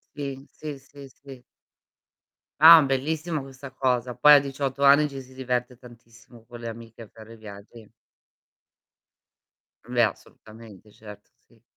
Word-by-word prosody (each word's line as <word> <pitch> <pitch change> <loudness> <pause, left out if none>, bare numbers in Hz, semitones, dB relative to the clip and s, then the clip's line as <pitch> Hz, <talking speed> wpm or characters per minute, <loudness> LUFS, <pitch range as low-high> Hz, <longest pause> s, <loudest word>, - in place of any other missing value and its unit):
Sì, 140 -1 -7
sì, 150 -2 -9
sì, 140 0 -15
sì. 135 -1 -15 1.2
Ah, 160 +1 +9
bellissima 150 +4 -3
questa 135 0 -12
cosa. 125 -2 -2
Poi 150 0 +6
a 145 - +6
18 140 0 -5
anni 145 +2 +4
ci 135 -1 -9
si 130 0 -17
diverte 125 -1 -4
tantissimo 115 -1 -19
con 120 -1 -12
le 115 - -6
amiche 115 0 -12
a 110 - -13
fare 110 +1 -14
viaggi. 105 +1 -14 1.9
Beh, 120 +1 -2
assolutamente, 110 0 -15
certo, 105 -1 -15 0.2
sì. 115 -2 -28
125 Hz, 135 wpm, -24 LUFS, 115-140 Hz, 1.9 s, Ah